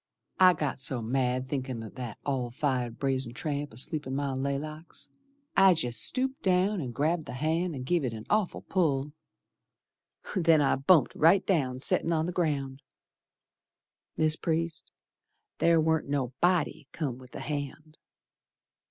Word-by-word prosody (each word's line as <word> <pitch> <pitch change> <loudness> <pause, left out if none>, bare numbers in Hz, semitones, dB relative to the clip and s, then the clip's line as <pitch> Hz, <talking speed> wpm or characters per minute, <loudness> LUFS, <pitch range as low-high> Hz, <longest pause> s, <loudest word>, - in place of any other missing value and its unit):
I 185 -1 +8
got 150 -5 -3
so 130 -1 -2
mad 125 +1 0
thinkin' 130 -4 -3
o' 110 - -7
that 120 -3 -7
all 130 -4 -1
fired 125 -2 -2
brazen 130 -3 -1
tramp 145 0 -3
Asleep 135 +5 -2
in 130 - -3
my 140 -1 -1
laylocks, 145 +4 -5 0.5
I 195 -2 +6
jest 125 -7 -2
stooped 265 +1 -1
down 185 +1 +2
and 130 -4 -4
grabbed 155 +6 0
th' - - -6
hand 160 +4 0
and 130 -1 -6
give 170 +2 +1
it 125 - -1
an 110 -1 -8
awful 210 -3 0
pull. 150 -6 0 1.2
Then 165 -4 +4
I 140 -2 +2
bumped 140 0 +4
right 170 +5 +4
down 130 -9 0
settin' 165 - +2
on 160 0 +1
the 175 - -2
ground. 145 -6 -1 1.4
Mis' 155 0 +3
Priest, 165 0 -2 0.7
ther 165 -1 +4
warn't 160 -2 +1
no 135 -3 -1
body 170 -4 +1
come 135 -6 -4
with 130 -1 -14
the - - -6
hand. 150 +1 -6
145 Hz, 150 wpm, -29 LUFS, 130-165 Hz, 1.4 s, I